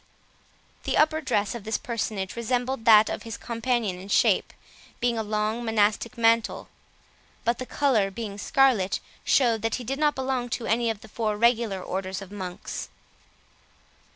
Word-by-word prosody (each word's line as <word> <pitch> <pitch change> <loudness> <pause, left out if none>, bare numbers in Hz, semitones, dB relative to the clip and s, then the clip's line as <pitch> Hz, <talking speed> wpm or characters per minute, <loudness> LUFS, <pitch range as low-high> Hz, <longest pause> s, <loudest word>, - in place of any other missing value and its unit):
The - - 0
upper 310 +1 +3
dress 210 -8 0
of 235 -3 -7
this 220 +2 -1
personage 215 -5 -3
resembled 245 +1 -2
that 215 -1 +8
of - - -3
his 225 -2 -7
companion 230 -5 -1
in 190 - -10
shape, - - +3 0.5
being 240 -1 +1
a 225 - -1
long 215 +2 -1
monastic 225 +2 +1
mantle; 230 0 +2 0.8
but 235 +1 +1
the 255 - -5
colour, 245 -9 +2
being 205 -1 -6
scarlet, 245 -7 +2 0.2
showed 235 -5 +3
that 225 0 0
he 250 - -5
did 270 +4 -3
not 300 -1 +2
belong 260 -2 -2
to 235 0 -3
any 235 +1 +1
of 220 -2 -3
the - - -12
four 215 -1 -2
regular 230 -3 +2
orders 190 0 -3
of 195 -1 -10
monks. 185 -3 -6
225 Hz, 160 wpm, -26 LUFS, 210-245 Hz, 0.8 s, that